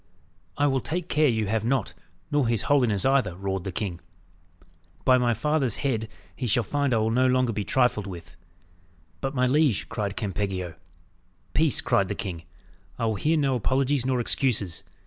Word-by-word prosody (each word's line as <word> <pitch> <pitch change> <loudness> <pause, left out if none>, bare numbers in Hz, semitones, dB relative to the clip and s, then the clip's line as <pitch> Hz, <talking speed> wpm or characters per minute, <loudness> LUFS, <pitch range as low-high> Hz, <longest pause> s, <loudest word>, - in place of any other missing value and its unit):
"I 145 - +2
will 135 -2 +2
take 175 +2 -3
care 150 0 +3
you 110 -4 +1
have 110 +1 -1
not, 125 -1 0 0.4
nor 145 -4 +2
his 115 -3 0
holiness 125 -8 +2
either," 130 -10 +2
roared 95 0 -3
the 95 - -3
king. 90 -2 -4 1.1
"By 130 -1 +5
my 120 -2 +2
father's 135 -1 0
head, 110 -5 0 0.3
he 125 - -3
shall 120 +2 +2
find 145 +1 0
I 115 - +3
will 110 0 +1
be - - 0
no 130 0 +4
longer 130 -2 +2
trifled 125 -2 +1
with." 85 -4 -9 0.8
"But, 135 +1 -3
my 125 -1 +3
liege," 140 -3 +2
cried 100 -2 -3
Campeggio. 95 -4 -3 0.8
"Peace!" 155 -4 +2
cried 100 - +2
the - - -2
king. 85 -4 -5 0.5
"I 115 - -1
will 110 - +1
hear 155 +10 +1
no 140 -3 +2
apologies 130 +3 +1
nor 130 -1 0
excuses. 115 - 0
120 Hz, 175 wpm, -26 LUFS, 100-135 Hz, 1.1 s, By